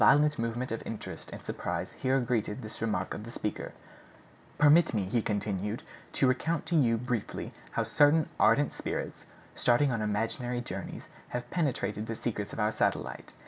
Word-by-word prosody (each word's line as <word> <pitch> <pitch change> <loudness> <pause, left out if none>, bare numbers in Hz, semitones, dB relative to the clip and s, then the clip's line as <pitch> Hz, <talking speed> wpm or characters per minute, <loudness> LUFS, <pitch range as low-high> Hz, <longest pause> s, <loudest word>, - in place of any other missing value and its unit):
A - - +7
violent 145 +6 +5
movement 115 +2 -1
of 115 - -2
interest 115 - -6
and - - -9
surprise - - -3
here 130 +1 +1
greeted 115 -4 -1
this 110 - -8
remark 105 -5 0
of 105 - -6
the 115 - -8
speaker. 105 -2 -4 0.9
"Permit 150 -1 +6
me," 105 - +2
he 115 +5 +1
continued, 105 0 -1 0.3
"to - - +3
recount 150 +5 +1
to 175 - 0
you 120 -7 +4
briefly 120 -2 -3 0.2
how - - +1
certain 150 +2 +4
ardent 145 0 +4
spirits, - - -4 0.3
starting 125 +3 +3
on 115 -3 -1
imaginary 115 +4 -1
journeys, 120 - -6 0.3
have 125 - -7
penetrated 120 - 0
the 115 - -3
secrets 105 -3 -3
of - - -6
our 105 0 +3
satellite. 105 - -1
115 Hz, 170 wpm, -30 LUFS, 105-135 Hz, 0.9 s, A